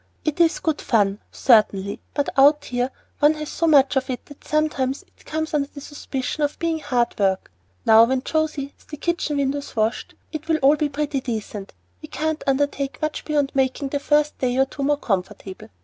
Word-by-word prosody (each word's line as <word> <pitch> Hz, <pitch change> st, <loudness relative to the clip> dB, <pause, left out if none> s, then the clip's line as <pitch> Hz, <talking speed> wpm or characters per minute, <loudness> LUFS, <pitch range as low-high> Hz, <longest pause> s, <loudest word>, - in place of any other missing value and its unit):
"It 310 Hz, +1 st, -1 dB
is 330 Hz, -1 st, +4 dB
good 315 Hz, -2 st, -1 dB
fun, 205 Hz, -4 st, +1 dB
certainly; 205 Hz, -5 st, +3 dB, 0.2 s
but 285 Hz, -, 0 dB
out 290 Hz, +2 st, +5 dB
here 245 Hz, 0 st, -1 dB, 0.3 s
one 300 Hz, +1 st, +5 dB
has 305 Hz, -1 st, -6 dB
so 335 Hz, -, 0 dB
much 280 Hz, -3 st, +5 dB
of 265 Hz, 0 st, 0 dB
it 250 Hz, -, -4 dB
that 290 Hz, -, -15 dB
sometimes 290 Hz, -3 st, 0 dB
it -, -, -27 dB
comes 315 Hz, 0 st, -3 dB
under 285 Hz, -2 st, +1 dB
the 285 Hz, -, -9 dB
suspicion 285 Hz, 0 st, -5 dB
of 290 Hz, 0 st, 0 dB
being 330 Hz, -1 st, -1 dB
hard 250 Hz, -5 st, 0 dB
work. 190 Hz, -, 0 dB, 0.3 s
Now, 220 Hz, +1 st, +8 dB
when 260 Hz, +1 st, -1 dB
José 310 Hz, -3 st, -1 dB
has -, -, -26 dB
the 300 Hz, -, -8 dB
kitchen 325 Hz, -2 st, -1 dB
windows 280 Hz, +1 st, -2 dB
washed 220 Hz, +1 st, -1 dB, 0.2 s
it 310 Hz, 0 st, -6 dB
will 320 Hz, -1 st, +2 dB
all 280 Hz, +3 st, +6 dB
be 300 Hz, 0 st, -1 dB
pretty 290 Hz, -1 st, -2 dB
decent. 215 Hz, -4 st, -5 dB, 0.3 s
We -, -, -9 dB
can't 315 Hz, 0 st, -2 dB
undertake 275 Hz, -1 st, 0 dB
much 310 Hz, 0 st, -3 dB
beyond 290 Hz, -3 st, 0 dB
making 270 Hz, +1 st, 0 dB
the 285 Hz, -, -1 dB
first 295 Hz, +1 st, +1 dB
day 250 Hz, -1 st, 0 dB
or 265 Hz, -, +4 dB
two 275 Hz, -, -8 dB
more 290 Hz, +1 st, +2 dB
comfortable. 195 Hz, -, -4 dB
280 Hz, 195 wpm, -22 LUFS, 250-300 Hz, 0.3 s, Now